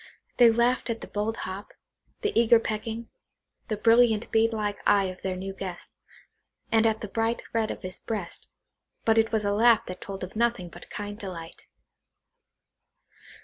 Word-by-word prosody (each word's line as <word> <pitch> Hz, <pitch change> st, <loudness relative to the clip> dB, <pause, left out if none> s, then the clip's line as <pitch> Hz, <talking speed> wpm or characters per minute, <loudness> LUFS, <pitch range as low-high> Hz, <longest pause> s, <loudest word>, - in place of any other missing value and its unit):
They 240 Hz, -2 st, +8 dB
laughed 240 Hz, +2 st, +2 dB
at 230 Hz, 0 st, -2 dB
the -, -, -7 dB
bold 215 Hz, +2 st, -2 dB
hop,–the 200 Hz, -, -7 dB
eager 230 Hz, 0 st, +6 dB
pecking,–the 225 Hz, 0 st, -6 dB
brilliant 225 Hz, 0 st, +4 dB
bead 225 Hz, +1 st, +3 dB
like 210 Hz, -2 st, -2 dB
eye 200 Hz, -1 st, +4 dB
of 185 Hz, -1 st, -5 dB
their 190 Hz, -1 st, -2 dB
new 190 Hz, +1 st, -5 dB
guest,–and 195 Hz, +4 st, -4 dB
at 220 Hz, -1 st, 0 dB
the 210 Hz, -, -4 dB
bright 225 Hz, +3 st, -1 dB
red 225 Hz, -1 st, +1 dB
of -, -, -6 dB
his 185 Hz, 0 st, -6 dB
breast; 210 Hz, -6 st, -5 dB, 0.6 s
but 225 Hz, 0 st, +5 dB
it 225 Hz, 0 st, +2 dB
was 220 Hz, -2 st, +1 dB
a 200 Hz, -, +2 dB
laugh 230 Hz, +1 st, +5 dB
that 180 Hz, 0 st, -7 dB
told 195 Hz, -1 st, -6 dB
of 185 Hz, -, -7 dB
nothing 230 Hz, -6 st, 0 dB
but 175 Hz, -, -11 dB
kind 205 Hz, 0 st, -6 dB
delight. 170 Hz, -5 st, -8 dB
215 Hz, 155 wpm, -27 LUFS, 195-230 Hz, 0.6 s, They